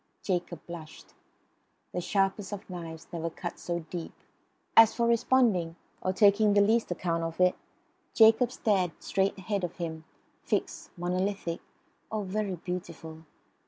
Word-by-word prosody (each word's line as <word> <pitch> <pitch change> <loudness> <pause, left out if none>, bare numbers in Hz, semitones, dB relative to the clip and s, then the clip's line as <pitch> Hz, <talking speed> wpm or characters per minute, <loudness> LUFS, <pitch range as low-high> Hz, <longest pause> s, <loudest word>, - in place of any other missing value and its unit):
Jacob 175 -2 -2
blushed. 165 -2 -10 0.8
The 180 - -2
sharpest 195 +2 0
of 205 0 -6
knives 165 -2 -7
never 165 0 -2
cut 170 +1 -6
so 170 -1 -3
deep. 175 -2 -5 0.6
As 225 -1 +8
for 235 - +1
responding, 230 -8 +3 0.3
or 185 - 0
taking 205 +1 +5
the 205 - +5
least 220 +3 +3
account 170 -1 -1
of 165 +1 -4
it, 180 0 +5 0.6
Jacob 225 +2 +6
stared 195 -9 +1
straight 195 +1 0
ahead 195 0 -2
of 175 - -3
him, 160 -2 -5 0.4
fixed, - - -2
monolithic 180 0 -1 0.5
oh, 215 -1 -1
very 195 0 -2
beautiful! 170 -2 -7
185 Hz, 135 wpm, -29 LUFS, 170-205 Hz, 0.8 s, As